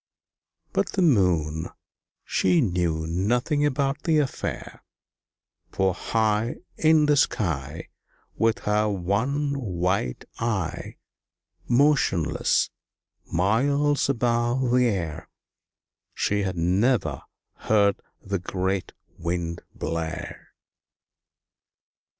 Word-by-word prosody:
But - - 0
the 190 - +2
Moon, 85 - +2 0.6
she 90 -2 +2
knew 85 -5 0
nothing 120 - 0
about 140 +1 -1
the 160 -3 +2
affair, 145 -3 -3 0.9
For 95 -1 +1
high 110 +3 0 0.2
In 155 -1 +4
the 150 0 +4
sky, 80 - -1 0.5
With 115 +1 +1
her 105 +1 +2
one 110 +10 0
white 90 - -1
eye, 95 -8 -2 0.7
Motionless, 125 - +2 0.6
miles 140 - +2
above 120 0 +1
the 125 0 +4
air, 85 -7 -3 0.9
She 105 0 0
had 95 -2 -2
never 100 +9 +1 0.4
heard 100 -2 +2 0.2
the 100 -1 -2
great 95 +1 -2 0.3
Wind 85 0 -3
blare. 80 0 -5
100 Hz, 85 wpm, -25 LUFS, 85-125 Hz, 0.9 s, In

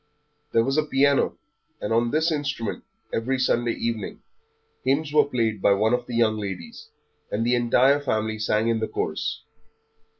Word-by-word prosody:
There 115 - +3
was 135 +4 0
a - - +2
piano, 140 -1 +2 0.4
and 105 - -2
on 115 +1 +2
this 155 +5 +1
instrument, 140 -7 -3 0.3
every 130 +4 0
Sunday 120 -2 +1
evening, 115 -3 -4 0.6
hymns 145 +3 0
were 150 - +5
played 115 -7 -1
by 100 - +5
one 110 +4 +2
of 125 0 -1
the 120 - -5
young 110 -2 +2
ladies, 95 -4 -7 0.4
and 115 +2 -1
the 120 - +2
entire 125 +4 +4
family 110 -5 -1
sang 110 +1 +1
in 115 -1 +1
the 110 - -1
chorus. - - -3
120 Hz, 165 wpm, -24 LUFS, 110-135 Hz, 0.6 s, were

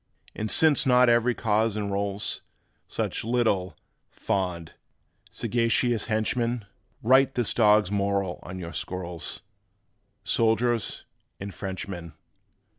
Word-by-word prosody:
And 110 - -4
since 150 0 +4
not 125 -1 +5
every 120 +1 +3
cause 110 0 +1
enrolls 100 0 -2 0.5
Such - - -3
little, 105 -8 0 0.3
fond, 90 -4 -3 0.6
sagacious 115 0 0
henchmen, 115 +1 -1 0.4
Write 130 +3 +4
this 120 -3 +1
dog's 105 -3 +4
moral 100 -2 -1
on 90 +1 -8
your 85 -3 -7
scrolls, 85 +2 -5 0.8
Soldiers 115 0 +1 0.3
and 100 0 -6
Frenchmen! 95 -4 -6
105 Hz, 100 wpm, -26 LUFS, 95-120 Hz, 0.8 s, not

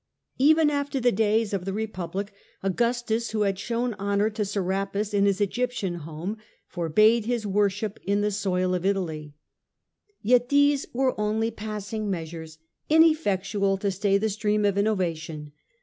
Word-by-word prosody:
Even 310 +2 +5
after 285 -1 -1
the 245 -1 +3
days 215 0 +1
of 195 -2 -1
the 195 +1 -3
Republic, 200 -2 -4 0.3
Augustus, 235 +3 0
who 215 -1 -2
had 195 -2 0
shown 235 +1 -1
honour 200 +2 +1
to 215 0 -2
Serapis 195 +1 -2
in 200 0 +3
his 200 0 +1
Egyptian 210 -2 -1
home, 165 +6 -6 0.3
forbade 215 +7 +3
his 240 -3 -1
worship 205 +1 0
on 200 +1 +2
the 210 0 +1
soil 185 -2 0
of 180 -1 -1
Italy. 160 -7 -2 0.9
Yet 245 +3 +3
these 285 0 +3
were 260 +1 +1
only 220 +2 0
pass 210 -1 -6
ing 215 -2 -2
measures, 160 -3 -5 0.3
ineffectual 205 - +3
to 200 +1 -1
stay 195 +1 +1
the 220 +2 0
stream 210 0 0
of 200 -1 +2
innovation. 165 -7 -2
205 Hz, 150 wpm, -26 LUFS, 190-225 Hz, 0.9 s, Even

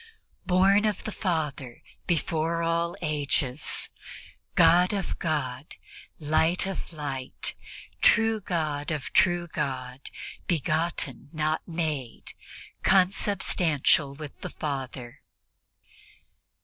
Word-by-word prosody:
"Born 195 +3 +5
of 210 -1 0
the 220 - -4
Father 150 - -3 0.2
before 165 -1 0
all 170 +1 0
ages, 145 -3 0 0.7
God 175 +3 +6
of 195 -2 -3
God, 145 -4 -2 0.4
Light 160 +4 +2
of 195 -2 -5
Light, 140 -5 -3 0.5
true 225 -1 +5
God 155 -5 -2
of 150 -5 -4
true 175 -1 +3
God, 130 -4 -4 0.4
begotten 155 -4 0
not 155 -1 0
made, 155 -8 -3 0.5
consubstantial 180 -7 +3
with 150 0 -9
the - - -4
Father 130 -4 -5
155 Hz, 90 wpm, -27 LUFS, 140-175 Hz, 0.7 s, God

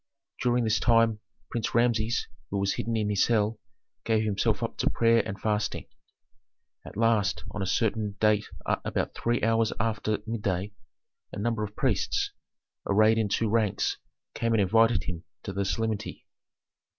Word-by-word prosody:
During 120 0 +2
this 110 -2 +2
time 115 -2 +3 0.3
Prince 115 -1 -2
Rameses, 115 -1 +2 0.2
who 100 - -2
was 100 0 +1
hidden 115 0 -2
in 105 -1 0
his 100 - +3
cell, 110 -1 +1 0.4
gave 110 -1 +2
himself 105 -2 0
up - - -3
to - - +2
prayer 115 0 +3
and 100 - -5
fasting. 105 -1 -1 1.0
At - - -10
last 110 -4 +2
on 105 - -5
a 95 - -1
certain 105 0 0
date 105 -1 +3 0.2
about - - -1
three 120 +1 -1
hours 115 0 +2
after 110 -1 0
midday 105 -3 -2 0.6
a - - -7
number 115 +1 -1
of 105 0 -6
priests, - - 0 0.6
arrayed 110 +3 +4
in 110 -2 0
two 115 - +1
ranks, 110 -2 0 0.3
came 115 -1 0
and 105 - +3
invited 115 +1 +3
him 85 -3 -5 0.2
to 95 - -5
the 100 +1 -1
solemnity. 110 +1 -3
110 Hz, 155 wpm, -27 LUFS, 105-115 Hz, 1.0 s, arrayed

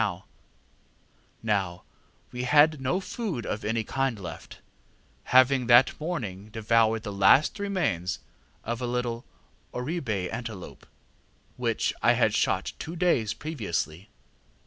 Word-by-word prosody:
Now 95 -5 -1 0.5
we 125 - -4
had 145 +3 +4
no 135 +8 0
food 195 - -4
of 105 - -3
any 110 +2 0
kind 135 0 -1
left, 95 -3 -9 0.7
having 130 -1 +4
that 120 +1 +6
morning 110 - -4
devoured 110 0 +2
the 105 - -5
last 100 - +4
remains 170 - -1 0.5
of 115 +2 -3
a 125 - -1
little 120 -1 -2 0.5
orib├® 125 - -3
antelope, 115 -5 -7 0.7
which - - 0
I - - +5
had - - +2
shot - - 0
two 165 +2 -6
days 160 - +1
previously. 100 - -4
120 Hz, 115 wpm, -27 LUFS, 105-145 Hz, 0.7 s, that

